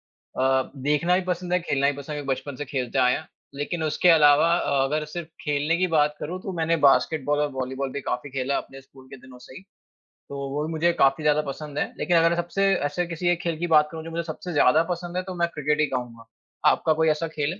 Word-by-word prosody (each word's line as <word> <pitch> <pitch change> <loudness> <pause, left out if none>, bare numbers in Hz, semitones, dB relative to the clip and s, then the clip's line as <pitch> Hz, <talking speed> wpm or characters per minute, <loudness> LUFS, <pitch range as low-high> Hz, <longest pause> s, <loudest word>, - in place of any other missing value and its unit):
अ, 130 0 0
देखना 150 +6 +1
भी 190 - 0
पसंद 180 0 -3
है, 180 - +4
खेलना 140 -4 0
भी 145 - -6
पसंद 140 +1 -9
है, 145 - -4
क्योंकि 135 -1 0
बचपन 145 -2 -8
से 145 - -5
खेलते 130 -2 -3
आए 125 -1 +4
हैं, 155 - -6 0.3
लेकिन 145 +4 -3
उसके 155 +3 +1
अलावा 150 0 +6
अ, 140 -5 +1
अगर 150 +3 -1
सिर्फ़ 160 +2 -7 0.2
खेलने 150 +2 0
की 185 +1 +1
बात 150 0 +2
करूँ 180 +5 -5
तो 195 - -5
मैंने 165 0 +1
बास्केटबॉल 145 +2 +2
और 150 0 0
वॉलीबॉल 130 +1 -3
भी 140 - -4
काफ़ी 130 +1 -4
खेला 135 +1 -1
अपने 135 - -7
स्कूल 135 0 -18
के - - -7
दिनों 130 -1 -15
से 125 +1 -14
ही। - - -10 0.7
तो 140 - -6
वो 145 +2 -2
भी 160 - -5
मुझे 165 +2 +2
काफ़ी 135 -1 +2
ज़्यादा 150 0 +3
पसंद 145 0 -7
है - - +1
लेकिन 175 -2 +2
अगर 165 +1 +4
सबसे 175 +3 -1 0.2
ऐसे 145 +5 -1
किसी 170 +1 -3
एक 175 -1 +1
खेल 170 -2 -2
की 175 - -1
बात 155 -2 +5
करूँ 160 -1 -7
जो 165 - -8
मुझे 170 +1 -2
सबसे 175 +3 -7
ज़्यादा 155 +2 +4
पसंद 175 0 -4
है - - +1
तो 185 0 -7
मैं 170 0 +1
क्रिकेट 150 0 0
ही - - +4
कहूँगा। 120 -3 -5 0.4
आपका 160 - +2
कोई 160 +1 +2
ऐसा 155 +2 0
खेल 155 0 -2
है? 185 - -12
150 Hz, 250 wpm, -24 LUFS, 140-170 Hz, 0.7 s, अलावा